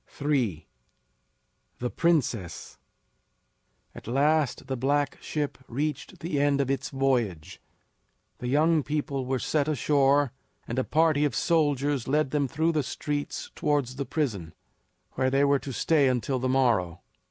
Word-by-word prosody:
III. 125 - 0 1.1
THE 125 0 -3
PRINCESS. 125 - -1 1.1
At - - -12
last 140 +2 +1
the 135 0 -3
black 140 +3 0
ship 150 -3 -3
reached 150 +7 -4
the 160 -3 -1
end 145 0 +2
of 135 -1 +1
its 135 - -2
voyage. 120 - -1 0.8
The 125 - -4
young 155 +4 +3
people 140 -3 -3
were 130 0 0
set 145 +4 0
ashore, 145 -2 +2 0.4
and 120 +3 -2
a - - +1
party 155 0 +2
of 145 -6 0
soldiers 145 -5 +1
led 150 0 +1
them 145 -2 +1
through 160 +6 +1
the 155 -2 +1
streets 145 +1 -4
towards 140 -4 -1
the 140 - -2
prison, 110 - -2 0.6
where 130 0 0
they 135 +2 +2
were 140 0 +3
to 135 - -7
stay 145 +2 +2
until 130 +1 0
the 130 +1 -1
morrow. 115 -10 +1
140 Hz, 140 wpm, -27 LUFS, 125-150 Hz, 1.1 s, young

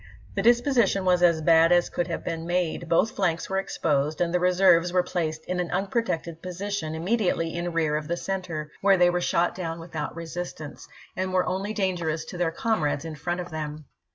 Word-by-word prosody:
The 195 - -1
disposition 235 -4 +3
was 180 -1 +3
as 170 -3 +4
bad 165 +1 +5
as 175 0 +4
could 175 - -1
have 170 - -4
been 165 0 -4
made; 175 -1 -1
both 200 +6 +3
flanks 175 -4 -1
were 195 - +1
exposed, 150 -5 -1
and 175 -1 0
the 180 - +3
reserves 180 -1 +4
were 180 0 +3
placed 160 -3 -3
in 180 0 -2
an 175 -2 -1
unprotected 180 -4 -2
position 185 -3 -4
immediately 175 -2 0
in 175 +1 -3
rear 160 -2 +1
of 150 0 -5
the 170 +2 -1
center, 175 -6 -4
where 195 -1 +5
they 175 0 +5
were 175 0 -1
shot 175 0 +1
down 165 -2 -4
without 165 -2 -5
resistance, 165 -2 -7 0.3
and 185 0 -2
were 185 -1 +2
only 190 +3 -2
dangerous 175 -6 -1
to 180 - -8
their 175 -2 +2
comrades 165 -5 -1
in 160 - -5
front 175 +4 -3
of 175 - -9
them. 155 -1 -5
175 Hz, 200 wpm, -26 LUFS, 165-185 Hz, 0.3 s, bad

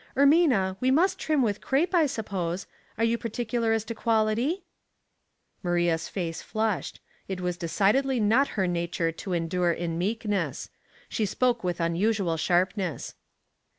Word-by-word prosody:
Ermina, 275 - +4
we 255 - +1
must 335 +8 +3
trim 305 -4 +1
with 210 -3 -1
crape, 315 +7 +1
I 330 -4 +4
suppose. 195 -8 -3 0.3
Are 225 - 0
you 230 0 +2
particular 230 0 -1
as 225 -1 +1
to 225 +1 -5
quality? 230 - +1 0.5
" - - -48
Maria's 175 -2 +1
face 170 -4 -4
flushed. 220 -3 -2 0.3
It 190 -1 -4
was 180 -1 -2
decidedly 215 +10 +1
not 225 +6 +3
her 190 - +2
nature 170 -1 -1
to 180 +3 -6
endure 175 +1 +1
in 170 0 -3
meekness. 210 +1 -2 0.4
She 215 - -1
spoke 240 +2 +1
with 180 -1 -2
unusual 175 +1 +1
sharpness. 180 0 0
205 Hz, 145 wpm, -27 LUFS, 175-240 Hz, 0.5 s, Ermina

